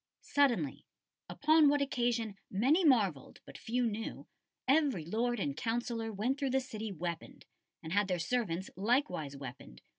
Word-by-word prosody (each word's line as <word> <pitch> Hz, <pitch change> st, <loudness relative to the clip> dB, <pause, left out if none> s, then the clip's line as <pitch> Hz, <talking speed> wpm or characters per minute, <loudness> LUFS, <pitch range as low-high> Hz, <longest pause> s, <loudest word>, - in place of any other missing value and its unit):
"Suddenly, 285 Hz, -1 st, +1 dB, 0.4 s
upon 310 Hz, 0 st, +5 dB
what 290 Hz, 0 st, +3 dB
occasion 240 Hz, -6 st, 0 dB
many 270 Hz, -, +3 dB
marvelled 205 Hz, -, +2 dB
but -, -, -13 dB
few 245 Hz, +2 st, -1 dB
knew, 225 Hz, 0 st, -4 dB, 0.4 s
every 270 Hz, -, +3 dB
lord 235 Hz, +6 st, 0 dB
and 145 Hz, -7 st, -2 dB
councillor 230 Hz, +3 st, -2 dB
went 235 Hz, +7 st, -1 dB
through 275 Hz, -2 st, 0 dB
the 265 Hz, +1 st, +2 dB
city 220 Hz, -4 st, -6 dB
weaponed, 170 Hz, -2 st, -6 dB, 0.4 s
and 160 Hz, -, -5 dB
had 205 Hz, 0 st, +3 dB
their 180 Hz, -2 st, 0 dB
servants 190 Hz, -1 st, -2 dB
likewise 195 Hz, -, 0 dB
weaponed 125 Hz, -, -9 dB
225 Hz, 145 wpm, -33 LUFS, 185-265 Hz, 0.4 s, upon